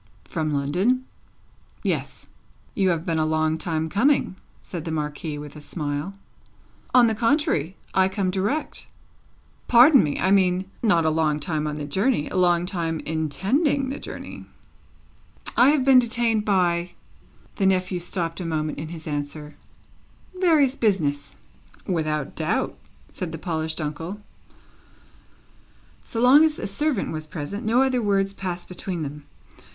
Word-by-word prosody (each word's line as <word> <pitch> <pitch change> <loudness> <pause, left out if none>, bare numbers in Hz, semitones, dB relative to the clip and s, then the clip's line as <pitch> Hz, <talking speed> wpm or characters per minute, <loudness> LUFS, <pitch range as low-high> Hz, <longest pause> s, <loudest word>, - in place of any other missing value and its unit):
"From 155 -2 -3
London?" 180 - +1 0.8
"Yes." - - -3 0.5
"You 195 -3 +2
have 170 -1 -1
been 165 -3 0
a - - +2
long 155 0 +1
time 160 -2 -2
coming," 230 - +2 0.2
said 170 -4 -7
the 165 - -5
Marquis, 150 0 -3
with 145 0 -9
a 150 - -10
smile. 150 +4 -4 0.8
"On 250 -1 +6
the 225 - +2
contrary; 225 - +1 0.2
I 190 0 +3
come 190 -1 -1
direct." 205 +12 -2 0.8
"Pardon 255 +3 +7
me! 145 -2 -1
I 190 - +2
mean, 185 -1 +3 0.2
not 170 -8 +3
a 160 - +3
long 155 -1 +1
time 155 0 -2
on 150 0 -3
the 150 - -4
journey; 190 - 0
a - - -7
long 175 -1 +3
time 165 -4 -2
intending 205 - 0
the 275 - -4
journey." - - -8 1.1
"I 250 +3 +6
have 290 -3 +2
been 265 -2 +7
detained 230 -2 +1
by" 175 -3 +1 0.6
the 195 - +2
nephew 185 -1 +1
stopped 170 -1 -3
a - - -4
moment 155 -2 -2
in 155 - -5
his 160 -1 -9
answer 150 0 -5 0.8
"various 315 -8 +3
business." 160 - 0 0.5
"Without 155 -5 -2
doubt," 165 +7 -1 0.4
said 180 -4 -4
the 165 - -5
polished 160 -1 -3
uncle. 160 +6 -4 1.8
So 225 - -5
long 260 +6 +7
as 315 -1 +2
a - - -4
servant 255 +4 -1
was 155 -1 -5
present, 165 +7 -5
no 235 +4 +3
other 260 -2 +1
words 195 -2 +1
passed 180 -3 -5
between 180 -2 -4
them. 145 0 -7
180 Hz, 145 wpm, -24 LUFS, 155-220 Hz, 1.8 s, Pardon